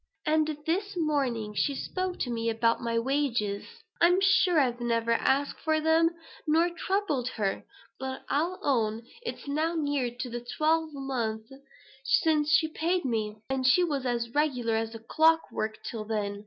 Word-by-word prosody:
And 310 -1 +1
this 390 +4 -1
morning 265 -9 0
she 280 +6 0
spoke 370 +5 -3
to 245 - -1
me 230 -1 -1
about 230 +1 +1
my 230 -1 -1
wages. 235 -5 0 0.4
I'm 350 +2 +6
sure 380 -3 +4
I've 245 -3 +1
never 230 -1 0
asked 275 +4 +1
for 315 -1 +1
them, 320 +1 +4 0.4
nor 330 +3 +3
troubled 345 -7 -1
her; 200 -3 -1 0.3
but 265 0 -5
I'll 335 +6 0
own 225 -4 +1 0.2
it's 475 - -6
now 310 +4 0
near 290 -5 0
on 240 0 -8
to 240 -1 -5
twelve 320 +1 +2
months 235 -6 -3 0.5
since 300 +1 +2
she 315 - +4
paid 335 +2 -1
me; 215 -3 -2
and 265 -1 -1
she 260 +8 +5
was 280 -6 -1
as 235 -1 -1
regular 255 -6 +1
as 225 +1 -2
clock 325 +1 +3
work 215 0 -3
till 215 0 -5
then. 205 -2 -2
270 Hz, 160 wpm, -28 LUFS, 230-315 Hz, 0.5 s, I'm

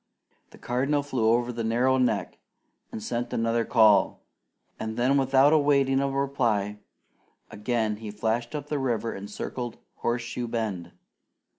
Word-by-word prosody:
The - - -16
Cardinal 135 +4 0
flew 125 -6 0
over 120 +1 +1
the 115 0 -3
narrow 125 +4 +2
neck 125 - 0 0.5
and 110 - -6
sent 120 +2 -3
another 115 +1 +1
call, 110 -4 +4 0.6
then 120 +5 0
without 135 +2 +4
awaiting 140 -3 +3
a 140 0 0
reply, 120 -7 0 0.7
again 110 -1 -1
he 110 -1 -7
flashed 110 +5 -2
up 145 -2 -4
the 145 -1 -2
river 120 -3 -1
and 100 +1 -8
circled 120 +3 -5 0.2
Horseshoe 120 0 -2
Bend. 110 -7 -3
120 Hz, 135 wpm, -26 LUFS, 110-135 Hz, 0.7 s, call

